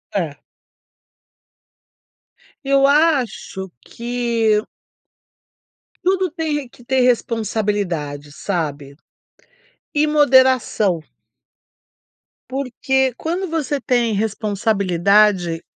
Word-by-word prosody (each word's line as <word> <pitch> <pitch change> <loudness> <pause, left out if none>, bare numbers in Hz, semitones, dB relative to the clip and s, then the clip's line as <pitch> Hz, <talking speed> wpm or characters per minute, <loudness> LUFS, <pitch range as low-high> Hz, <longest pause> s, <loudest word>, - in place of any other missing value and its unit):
É. 165 -7 -2 2.3
Eu 275 0 +4
acho 275 - +1 0.2
que 235 -3 0 1.4
tudo 375 0 +2
tem 320 -2 -3
re 295 -3 -3
que 245 - -18
ter 265 +2 0
responsabilidade, 205 - -1
sabe. 145 -7 -4 1.0
E 300 +1 +2
moderação. 260 - +3 1.5
Porque 265 0 0
quando 355 +4 -3
você 300 -4 -2
tem 240 -3 +1
responsabilidade, 200 -4 +1
235 Hz, 70 wpm, -20 LUFS, 200-275 Hz, 2.3 s, Eu